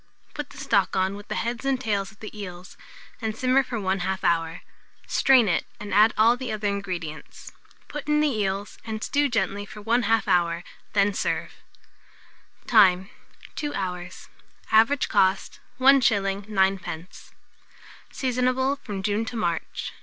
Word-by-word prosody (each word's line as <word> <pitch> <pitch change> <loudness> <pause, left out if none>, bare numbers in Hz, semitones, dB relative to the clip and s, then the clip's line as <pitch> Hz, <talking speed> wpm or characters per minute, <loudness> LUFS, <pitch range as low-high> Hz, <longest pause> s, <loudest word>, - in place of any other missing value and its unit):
Put 295 -2 -6
the - - -14
stock 200 -4 +1
on 190 +1 +1
with 205 0 -11
the - - -4
heads 235 +1 -3
and 270 -1 0
tails 205 -5 -1
of 205 - -23
the 215 - -8
eels, 180 -3 -8 0.5
and 220 -1 -3
simmer 255 +2 +3
for 255 -3 -5
1/2 190 -1 -1
hour; 165 -1 0 0.4
strain 260 -4 +4
it, 180 - 0
and 205 -2 -6
add 215 +3 +6
all 230 +2 +5
the 250 -2 -5
other 215 -1 -2
ingredients. 180 -7 -5 0.4
Put 295 -1 -7
in 300 0 +3
the 305 - +3
eels, 200 -1 -2
and 220 -1 -5
stew 290 0 +1
gently 205 -4 -1
for 210 +1 -11
1/2 225 0 +1
hour, 170 -1 +2 0.3
when 200 -1 +3
serve. - - -2 1.1
Time. 190 -4 +4 0.4
2 295 -1 -4
hours. 180 -2 -5 0.4
Average 225 +6 +4
cost, 190 +1 +1 0.2
1s. 210 -7 +3
9d. 190 -3 -2 0.8
Seasonable 255 +1 0
from 205 -7 -6
June 210 +2 0
to 225 +2 -6
March. 170 -7 -3
210 Hz, 145 wpm, -25 LUFS, 190-240 Hz, 1.1 s, add